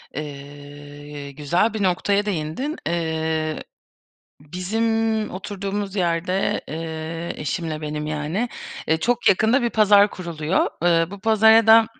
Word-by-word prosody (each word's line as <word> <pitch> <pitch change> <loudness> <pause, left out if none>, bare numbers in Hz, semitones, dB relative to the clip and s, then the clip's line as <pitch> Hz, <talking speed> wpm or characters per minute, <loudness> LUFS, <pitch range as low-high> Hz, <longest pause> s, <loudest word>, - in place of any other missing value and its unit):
Eee, 145 0 -9
güzel 170 +10 0
bir 215 - -2
noktaya 200 +2 +1
değindin. 200 - -3
Eee, 160 -2 -1 0.8
bizim 220 +7 -1
oturduğumuz 200 +1 -4
yerde, 180 +1 0
eee, 160 +1 -5
eşimle 155 0 -3
benim 150 0 -4
yani, 155 +10 -2 0.4
eee, 160 - +4
çok 245 +5 +2
yakında 220 +7 +3
bir 235 - +1
pazar 205 -2 +5
kuruluyor. 170 -1 -1 0.2
Iıı, 170 0 +3
bu 200 - -9
pazara 220 +1 +5
da, 220 0 +7
175 Hz, 115 wpm, -22 LUFS, 155-210 Hz, 0.8 s, da